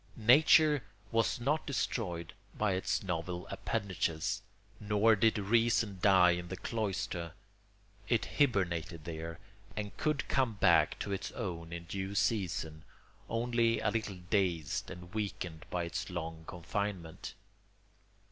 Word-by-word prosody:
Nature 150 +5 +6 0.3
was 115 0 +1
not 145 +6 0
destroyed 90 - -2 0.2
by 105 -3 +2
its 95 +2 0
novel 90 -1 -3
appendages, 85 -5 -1 0.4
nor 105 +2 +4
did 110 +2 +3
reason 110 -1 +2
die 95 -3 +6
in 90 0 -2
the 95 - -5
cloister: 95 -5 -3 0.8
it - - +2
hibernated 90 - +1
there, 80 0 -5 0.4
and 105 -1 -4
could 150 -6 0
come 130 -4 +2
back 100 - +4
to 100 - -4
its 100 - -3
own 85 -3 -5
in 85 0 -5
due 95 +3 -4
season, 90 -7 0 0.5
only 115 0 +2
a - - +1
little 110 -4 -2
dazed 90 -7 0
and 90 0 -10
weakened 100 -7 -4
by 90 -1 -1
its 85 - -4
long 80 -2 -5
confinement. 90 -1 -4
95 Hz, 125 wpm, -33 LUFS, 85-115 Hz, 0.8 s, Nature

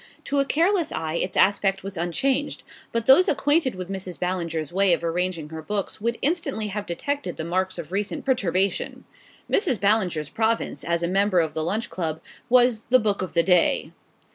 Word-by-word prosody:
To 280 - 0
a 275 - +2
careless 340 +4 +1
eye 160 -1 -3
its 185 +2 -2
aspect 195 0 +2
was 195 0 -6
unchanged; 255 - -1 0.3
but 230 -1 -1
those 325 +10 +6
acquainted 290 - +1
with 185 -1 -6
Mrs. 190 -2 -6
Ballinger's 170 -4 -2
way 195 -1 +4
of 170 - -1
arranging 170 -2 -2
her 160 0 -7
books 200 +5 -4
would 235 +1 -1
instantly 275 -9 0
have 205 +1 -5
detected 285 +12 -3
the 160 - -4
marks 185 +2 -1
of 170 -1 -7
recent 200 -1 -3
perturbation. 195 -7 0 0.4
Mrs. 295 - +1
Ballinger's 185 -8 +1
province, 225 0 -1
as 170 0 -1
a - - +1
member 195 0 +2
of 160 -2 0
the 160 - -2
Lunch 215 +8 -2
Club, 160 -3 -3 0.3
was 245 -2 +4
the 255 - +5
Book 210 -5 0
of 185 - -4
the 170 - +3
Day. 180 -1 +3
195 Hz, 185 wpm, -24 LUFS, 170-235 Hz, 0.4 s, those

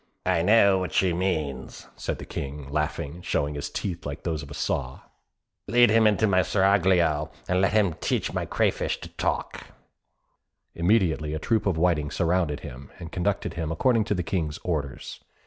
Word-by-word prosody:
"I 90 -2 +2
know 100 0 +5
what 90 - -4
she 95 -2 +2
means," 80 -8 -3
said - - -4
the - - -8
King, 70 0 -6
laughing, 75 0 -2
and 90 - -13
showing 75 +1 -1
his 70 0 -4
teeth, 90 -4 -4
like 70 +1 -6
those 80 -3 -2
of 70 - -10
a 70 - -8
saw. 65 +1 -2 0.7
"Lead 120 +1 +5
him 110 0 +5
into 105 +1 +3
my 95 -3 +3
seraglio, 90 -5 +2 0.2
and 90 +1 +2
let 95 - +2
him 105 -6 +3
teach - - -2
my - - -2
crayfish - - 0
to - - -8
talk." - - -3 1.1
Immediately 85 -5 +1
a - - -1
troop 110 +7 0
of 90 -4 +1
whiting 80 -4 +1
surrounded 85 -3 0
him, 70 0 -9
and 85 -3 -9
conducted 100 +2 -1
him 80 -2 -3
according 115 +7 +2
to 105 - 0
the 90 - -1
King's 80 -3 -2
orders. 75 -6 -4
85 Hz, 180 wpm, -26 LUFS, 75-95 Hz, 1.1 s, know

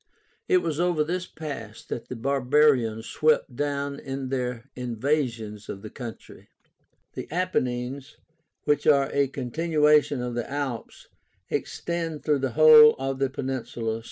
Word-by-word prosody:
It 370 -2 +3
was 155 -1 -2
over 175 -3 +2
this 180 +3 -3
pass 130 -9 -8
that 120 - -6
the 125 - -6
Barbarians 130 -3 +2
swept 155 -4 +1
down 140 0 -2
in 135 -1 -5
their 125 -3 -3
invasions 120 -4 -2
of 100 - -7
the 110 - -8
country. 120 -3 -10 0.6
The - - -7
Apennines, 135 -5 -2 0.5
which 150 -1 +1
are 140 -2 +4
a 140 -1 +2
continuation 150 +2 +2
of 125 0 -3
the 120 -1 -3
Alps, 140 -4 -5 0.4
extend 165 -3 -3
through 150 -2 +2
the 135 -3 -2
whole 155 -1 +8
of 135 0 -3
the 135 -1 +1
peninsula. 120 -4 -3
135 Hz, 135 wpm, -26 LUFS, 125-150 Hz, 0.6 s, whole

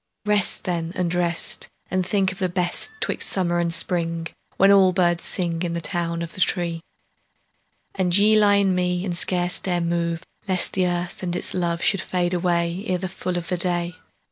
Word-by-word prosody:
Rest 210 -2 +2
then 170 -2 -2
and 180 -2 -1
rest, 170 -1 +3 0.2
And 185 0 +1
think 190 0 +1
of 190 - -10
the 185 -1 0
best 175 - -1
'Twixt - - -1
summer 175 -2 0
and 170 -1 0
spring, 165 -1 -1 0.3
When 195 +1 +6
all 190 -2 +5
birds 175 -2 +1
sing 170 -3 -2
In 175 -2 -2
the 170 - -2
town 170 0 -2
of 165 - -8
the 185 - -5
tree, 170 -3 0 1.1
And 185 -1 +2
ye 210 +2 +5
lie 205 -1 +5
in 200 -2 +3
me 180 0 0
And 180 -3 -2
scarce 180 0 0
dare 180 -2 -1
move, 170 0 -1 0.2
Lest 185 -2 +1
the 185 -1 +1
earth 175 0 -3
and 175 -2 -2
its - - 0
love 170 -2 -1
Should 195 -4 +2
fade 175 +2 -1
away 175 +1 0
Ere 185 - +1
the 185 +1 -4
full 180 -1 -4
of 170 -1 -5
the 180 - 0
day. 175 0 -1
175 Hz, 195 wpm, -23 LUFS, 170-185 Hz, 1.1 s, When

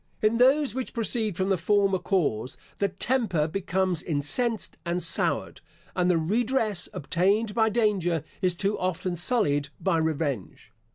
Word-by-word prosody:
In 215 +2 +3
those 265 +1 +4
which 260 0 -5
proceed 220 -4 -1
from 190 +1 0
the 190 -3 +1
former 195 +1 +2
cause, 145 - -1 0.2
the 200 - +2
temper 195 -6 0
becomes 185 -1 -1
incensed 175 - -1
and 170 0 -1
soured; - - -1 0.3
and 180 -1 +2
the 175 - +3
redress, 215 +4 0
obtained 195 +6 0
by 220 0 +3
danger, 195 -8 +1 0.2
is 180 -2 +1
too 200 +4 -1
often 185 0 -2
sullied 160 - +2
by 165 -1 +1
revenge. 150 - -3
190 Hz, 145 wpm, -26 LUFS, 165-220 Hz, 0.3 s, those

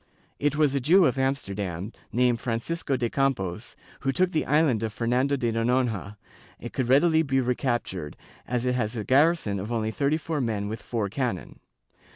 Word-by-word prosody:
It 145 0 +1
was 150 -3 +3
a 140 - +1
Jew 175 +8 +5
of 135 -1 +1
Amsterdam, 100 -8 -2 0.2
named 120 -1 +2
Francisco 130 +4 -2
de 120 -1 0
Campos, 115 -7 -1 0.2
who 135 - 0
took 180 +6 +1
the 155 - -1
island 150 -6 +3
of 110 -1 -2
Fernando 125 +6 +1
de 120 -4 -1
Noronha; 115 -3 0 0.4
it - - -8
could 125 -2 -1
readily 160 +4 +5
be 135 -4 +1
re 125 -1 +1
captured, 120 - -3 0.3
as 125 0 -1
it 125 - +1
has 120 -2 -1
a 110 - -3
garrison 135 - +3
of 105 +5 -5
only 110 -2 -1
thirty 140 +5 +1
four 160 -2 -3
men 105 -4 -1
with 110 +1 -5
four 110 -4 -2
cannon. 115 -3 -3
125 Hz, 185 wpm, -26 LUFS, 110-140 Hz, 0.4 s, Jew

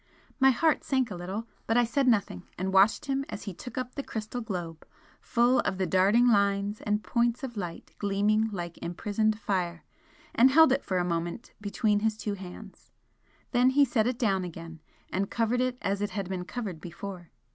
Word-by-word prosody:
My 265 0 +6
heart 310 +4 +2
sank 260 -5 0
a - - -4
little, 190 +6 -5 0.2
but 225 - +2
I 245 - +5
said 255 +4 +1
nothing, 200 - +1
and 190 +1 -2
watched 195 +3 +4
him 275 -1 -1
as - - -6
he 200 - -5
took 250 +9 -10
up 255 -1 -3
the 280 - -3
crystal 225 -1 -5
globe, 175 -7 -5 0.4
full 240 +1 +3
of 190 - 0
the 190 - 0
darting 200 +7 +4
lines 200 -1 +2
and 210 0 -1
points 235 +1 0
of 250 -3 -5
light 175 -5 -6
gleaming 210 +2 +2
like 175 -4 -6
imprisoned 215 +5 -1
fire, 180 -5 -2 0.5
and 250 +3 +6
held 320 +1 +6
it 270 - +1
for 185 - -1
a 175 - +1
moment 170 +6 -3
between 205 0 +1
his 220 0 0
two 210 -1 -3
hands. 190 +1 -10 0.6
Then 250 0 +4
he 280 +2 +5
set 230 -3 +1
it 250 -1 -1
down 195 -7 +1
again, 165 -2 -8 0.3
and 195 +1 -1
covered 235 +2 +1
it 255 -1 0
as 200 0 -1
it 205 - 0
had 200 -4 -4
been 180 -1 -4
covered 195 -8 -5
before. 175 0 -8
210 Hz, 195 wpm, -28 LUFS, 185-240 Hz, 0.6 s, My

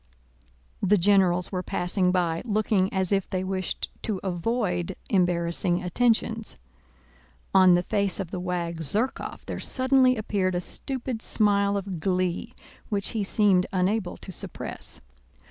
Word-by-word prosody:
The 200 +2 +4
generals 180 -1 +3
were 185 -2 -2
passing 180 +1 0
by, 170 -3 0
looking 210 -4 +1
as 190 -2 -1
if 195 -1 +1
they 185 -1 -2
wished 185 0 -3
to 210 -4 -2
avoid 185 -1 -1 0.2
embarrassing 175 -1 +1
attentions. 225 +3 0 1.0
On 185 -2 +7
the 175 - +1
face 200 -1 -1
of 185 -4 -4
the 185 - -3
wag 175 -2 -3
Zherkóv 210 - -2
there - - -5
suddenly 260 -1 +3
appeared 195 -4 -1
a - - +1
stupid 250 +4 -2
smile 200 -3 +2
of 195 -3 -4
glee 185 +5 -1 0.3
which 200 -3 -1
he 220 -3 -1
seemed 195 -2 +3
unable 190 +1 0
to 190 - -8
suppress. - - -7
190 Hz, 135 wpm, -26 LUFS, 180-210 Hz, 1.0 s, On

